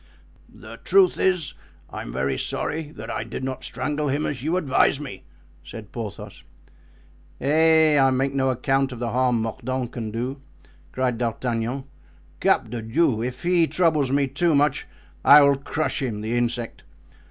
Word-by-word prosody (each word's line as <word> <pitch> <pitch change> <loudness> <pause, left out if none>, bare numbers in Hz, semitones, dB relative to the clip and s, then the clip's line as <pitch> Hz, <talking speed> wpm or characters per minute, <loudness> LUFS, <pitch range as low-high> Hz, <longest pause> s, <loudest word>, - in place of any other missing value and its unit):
"The - - -12
truth 390 -2 +3
is, 180 -6 +1 0.4
I'm - - -6
very 65 +2 -1
sorry 155 -1 -3
that - - -7
I - - -3
did - - -7
not 130 0 -4
strangle 150 0 -3
him 145 +2 0
as 130 -4 -3
you 160 +6 0
advised 140 -4 +2
me," 125 -11 -8 0.4
said 105 +5 -10
Porthos. 110 -4 -7 1.0
"Eh! 155 +1 +4
I 135 0 +5
make 135 +1 0
no 135 -1 +1
account 135 +2 0
of 125 - -7
the 120 -1 -3
harm 125 -1 +2
Mordaunt 125 +2 -3
can 115 -3 -5
do!" 125 +5 -4 0.5
cried 125 -3 -1
D'Artagnan. 120 +2 -2 0.6
"Cap 110 - +2
de 120 -2 -4
Diou! 115 0 +1
if 125 +1 -5
he 175 -2 +3
troubles 155 -7 +1
me 140 0 +2
too 150 +4 +1
much 145 0 +1 0.4
I 145 +1 +9
will 140 0 +5
crush 140 +2 -3
him, 115 -6 -3
the 110 +2 -2
insect! 120 -1 -2
130 Hz, 160 wpm, -23 LUFS, 120-150 Hz, 1.0 s, I